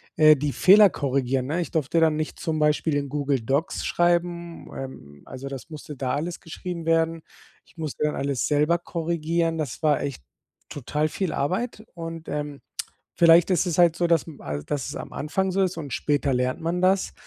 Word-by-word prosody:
äh, 155 -1 +7
die 145 0 -2
Fehler 200 +1 +7
korrigieren, 135 -3 -1
ne? 170 +4 -1
Ich - - -5
durfte 160 0 +1
dann 160 -2 +4
nicht 155 0 -4
zum 160 -1 -2
Beispiel 150 0 +2
in 140 -1 -1
Google 140 -3 0
Docs 140 +10 -1
schreiben, 175 -1 0
ähm, 70 - -9
also, 130 +1 -8
das 135 +3 -7
musste 150 -1 -8
da 130 -1 -2
alles 170 +4 -3
geschrieben 170 0 -6
werden. 165 0 +1 0.4
Ich - - -26
musste 155 -2 -4
dann 150 - 0
alles 140 -2 -1
selber 150 +3 +2
korrigieren. 165 -1 -1
Das 150 +1 -4
war 150 -2 +3
echt 140 - -5 0.5
total 150 +3 -2
viel 190 -1 -2
Arbeit 210 - -2
und, 165 -1 -7
ähm, 145 -1 -4 0.5
vielleicht 170 +1 +6
ist 185 - +2
es 170 - -1
halt 170 -2 +5
so, 175 - +1
dass 170 -3 +3
m 155 - -11
al 75 0 -4
dass 145 -3 -3
es - - -6
am - - -7
Anfang 190 +6 -1
so 195 +1 +1
ist 185 -2 0
und 145 -5 -5
später 145 -2 0
lernt 125 +3 0
man 170 +2 -1
das, 190 +1 +2
155 Hz, 195 wpm, -25 LUFS, 140-170 Hz, 0.5 s, äh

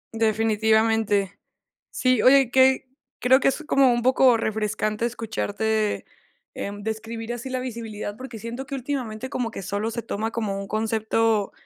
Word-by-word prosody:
Definitivamente. 220 -2 +2 0.5
Sí, 255 -3 +2
oye, 265 -1 +6
que 265 0 +4 0.3
creo 260 +2 +5
que - - +2
es 270 - -4
como 270 -2 +4
un 240 0 -1
poco 255 -2 +5
refrescante 215 0 -1
escucharte, 220 -2 -2 0.5
em, 205 0 -6
describir 225 +1 -4
así 240 +2 -6
la 255 0 -2
visibilidad, 225 -4 -5
porque 255 -3 -8
siento 235 +5 -6
que 275 - -4
últimamente 260 -3 -4
como 245 -3 -2
que 195 - -7
solo 205 +4 -2
se 235 0 -4
toma 220 +2 -3
como 205 -4 -2
un 200 - -6
concepto 220 -1 0
225 Hz, 150 wpm, -24 LUFS, 215-250 Hz, 0.5 s, oye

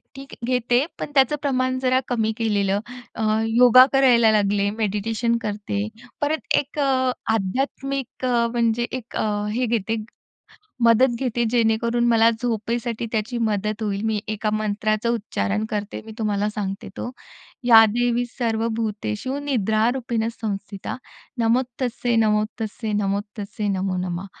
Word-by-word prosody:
ठीक 270 0 -10
घेते, 250 +1 +2
पण - - -5
त्याचं 270 +1 +4
प्रमाण 255 -2 0
जरा 255 0 +2
कमी 220 -3 0
केलेलं 205 -3 +1 0.4
अ, - - -4 0.3
योगा 245 +2 +7
करायला 245 -4 +5
लागले, 200 -1 +2
मेडिटेशन 225 +2 0
करते, 205 0 -3 0.3
परत 300 +2 0
एक 290 +1 -2
आध्यात्मिक 260 0 -1
अ, 240 -2 +2
म्हणजे 235 0 +1
एक 250 -2 -6
अ, 210 -1 -1
हे 250 +3 0
घेते, 225 -1 -1 0.8
मदत 235 +2 +5
घेते 240 -2 0
जेणेकरून 235 0 +2
मला 230 -1 +5
झोपेसाठी 235 0 -2
त्याची 225 +2 -1
मदत 215 -1 -1
होईल. 200 -1 -2
मी 220 -1 0
एका 215 0 -1
मंत्राचं 215 +1 -1
उच्चारण 105 - -2
करते, 205 0 -3
मी 220 - -8
तुम्हाला 210 -2 0
सांगते 195 -2 -4
तो, 245 - -4 0.5
"या 225 -2 +8
देवी 240 +2 +1
सर्वभूतेषु 225 +1 -2
निद्रारूपेण 235 -1 0
संस्थिता, 200 -2 -4 0.4
नमस्तस्यै 245 +1 0
नमस्तस्यै 215 0 0
नमस्तस्यै 205 +1 -2
नमो 190 -1 -1
नमः" 180 +1 -3
225 Hz, 125 wpm, -23 LUFS, 210-245 Hz, 0.8 s, या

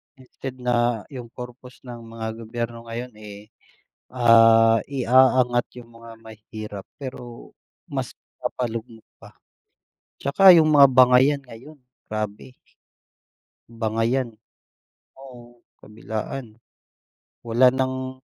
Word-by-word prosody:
Instead 130 0 -10
na 120 -2 0
yung 125 -3 -8
purpose 125 +2 -12
ng 120 -2 -9 0.2
mga 115 -1 -6
gobyerno 115 0 -6
ngayon, 120 +2 -6
eh, 105 0 -12 0.6
ah, 115 -2 +5
iaangat 130 -2 +2 0.2
yung 115 - -18
mga 115 0 -13
mahirap, 110 -2 -10 0.2
pero 125 -3 -9 0.4
mas - - -4
ipapalugmok 115 -2 -7
pa. - - -16 0.9
'Tsaka 185 +7 +6
yung 160 -2 +4
mga 145 -2 +8
bangayan 130 +2 +4
ngayon, 130 +5 -14 0.3
grabe. 110 +3 -6 1.2
Bangayan, 115 +2 -1 0.9
oo, 120 -3 -15 0.2
kabilaan. 110 +2 -7 0.8
Wala 120 +2 +3
ng 130 0 -3
120 Hz, 95 wpm, -23 LUFS, 115-130 Hz, 1.2 s, mga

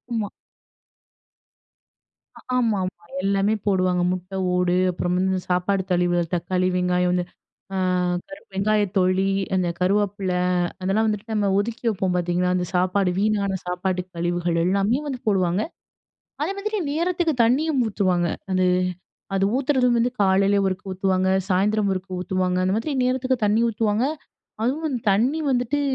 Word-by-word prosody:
ம்மா 210 -2 -1 2.3
ஆமா, 230 -5 +2
ஆமா. 185 - -8 0.2
எல்லாமே 200 +2 +2
போடுவாங்க. 185 -2 +2
முட்டை 185 +1 -6 0.2
ஓடு, 180 0 +2 0.2
அப்புறம் 180 0 -1
வந்து 190 +1 +1
இந்த 185 - -1
சாப்பாட்டு 190 +2 +1
கழிவுகள் 175 0 +2
தக்காளி, 185 +1 0
வெங்காயம் 180 0 +1
வந்து 180 -1 0 0.5
அ - - -1 0.5
கருவப் 290 -8 -13
வெங்காயத் 205 0 +1
தொழி, 190 +1 +2 0.2
அந்த 180 -2 +1
கருவேப்பிலை. 190 -1 0 0.4
அதெல்லாம் 200 +4 +1
வந்துட்டு 210 +1 -2
நம்ம 205 -2 +1
ஒதுக்கி 230 +3 -3
வைப்போம் 190 -4 0
பார்த்தீங்களா? 180 +1 +1
அந்த 180 0 0
சாப்பாடு 185 +1 +2
வீணான 200 -2 +1
சாப்பாட்டு 180 +1 -1
கழிவுகள் 175 0 -1
எல்லாமே 200 +7 +2
வந்து 260 -3 -4
போடுவாங்க. 185 -1 +2 0.8
அதே 360 +6 0
மாதிரி 425 +1 -2
நேரத்துக்கு 340 0 0
தண்ணியும் 275 +3 +2
ஊத்துவாங்க. 185 -4 +1 0.2
அது 185 0 +2 0.7
அது 195 0 +2
ஊத்துறதும் 255 -3 +2
வந்து 245 +2 +2
காலையில் 195 +1 +3
ஒருக்க 185 0 -3
ஊத்துவாங்க. 185 0 +1 0.2
சாயந்தரம் 200 +2 +2
ஒருக்க 185 -1 -4
ஊத்துவாங்க. 185 0 0
அந்த 185 - +1
மாதிரி 260 +7 -2
நேரத்துக்கு 255 0 +1
தண்ணி 210 +2 +3
ஊத்துவாங்க. 220 +1 0 0.6
அதுவும் 280 +1 -1
தண்ணி 245 +11 +2
வந்துட்டு, 250 +3 +1
195 Hz, 135 wpm, -23 LUFS, 180-225 Hz, 2.3 s, காலையில்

